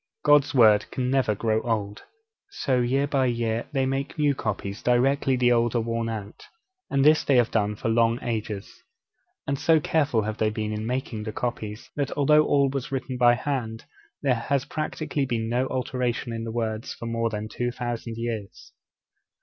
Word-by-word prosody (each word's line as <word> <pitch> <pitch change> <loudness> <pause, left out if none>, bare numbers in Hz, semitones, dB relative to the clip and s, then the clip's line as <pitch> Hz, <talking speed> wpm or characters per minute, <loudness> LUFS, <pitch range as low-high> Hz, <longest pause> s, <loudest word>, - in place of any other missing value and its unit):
God's 145 -1 +5
Word 110 -4 +5
can 125 -1 -2
never 130 -6 +2
grow 110 +1 0
old.' 105 -3 -2 0.5
So, 135 - 0
year 130 +3 +1
by 135 -2 +1
year, 115 -1 -1
they 135 -2 +1
make 135 +3 -3
new 145 -2 +3
copies 105 -4 -4
directly 135 +2 +2
the 125 -1 +3
old 120 0 +2
are - - +3
worn 115 0 -2
out, 105 -2 -6 0.5
and 140 0 +2
this 155 +1 +5
they 140 - +2
have 120 -2 +3
done 105 -1 +1
for 105 - -4
long 115 +1 +3
ages. 110 -4 -4 0.6
And 140 0 -2
so 165 -1 +4
careful 145 -7 +1
have 110 +1 -4
they 110 - +2
been 110 0 -3
in 105 +1 -4
making 125 -3 -3
the 110 - -3
copies, 110 -2 -5
that 140 -2 -1
although 150 +2 +5
all 140 -1 +3
was 135 +1 -4
written 130 -1 -3
by 120 -1 +5
hand, 120 -4 -3 0.4
there 135 -3 +3
has 125 +3 -1
practically 155 -2 -3
been 115 -2 -1
no 125 +2 +1
alteration 125 -2 -2
in 115 0 -4
the 115 - -4
words 110 -1 -3
for - - -8
more 115 0 -1
than 105 0 -4
two 120 +3 -2
thousand 120 -2 -5
years. 115 -4 -5
120 Hz, 185 wpm, -25 LUFS, 110-135 Hz, 0.6 s, God's